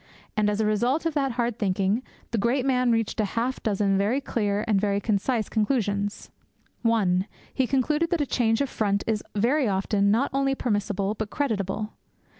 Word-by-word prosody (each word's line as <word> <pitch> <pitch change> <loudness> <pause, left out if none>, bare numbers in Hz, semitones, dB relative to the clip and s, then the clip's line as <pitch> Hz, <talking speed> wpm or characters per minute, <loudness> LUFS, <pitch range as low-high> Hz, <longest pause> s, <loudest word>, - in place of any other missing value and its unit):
And, 210 -1 +2
as 210 0 -1
a 220 - +2
result 240 +9 +1
of 330 - 0
that 275 -4 0
hard 235 -1 -1
thinking, 195 +2 +1 0.3
the 230 - 0
great 250 +5 +1
man 250 -2 +2
reached 225 -1 0
half 230 +5 0
a - - -14
dozen 200 -2 +1
very 215 +7 +1
clear 210 -6 -1
and 205 -3 +2
very 200 -1 +1
concise 215 +2 0
conclusions. 205 -3 -1 0.5
(1) 200 -5 +2 0.3
He 260 -2 +1
concluded 300 +6 +1
that 345 - +1
a 290 - +1
change 225 -3 +1
of 280 - 0
front 200 -2 0
is 220 -2 -1
very 250 +6 +2
often 200 +1 +1
not 230 +7 +2
only 270 0 +1
permissible 205 -4 -1
but 215 -1 -4
creditable. 215 -5 -2
220 Hz, 180 wpm, -26 LUFS, 205-255 Hz, 0.5 s, And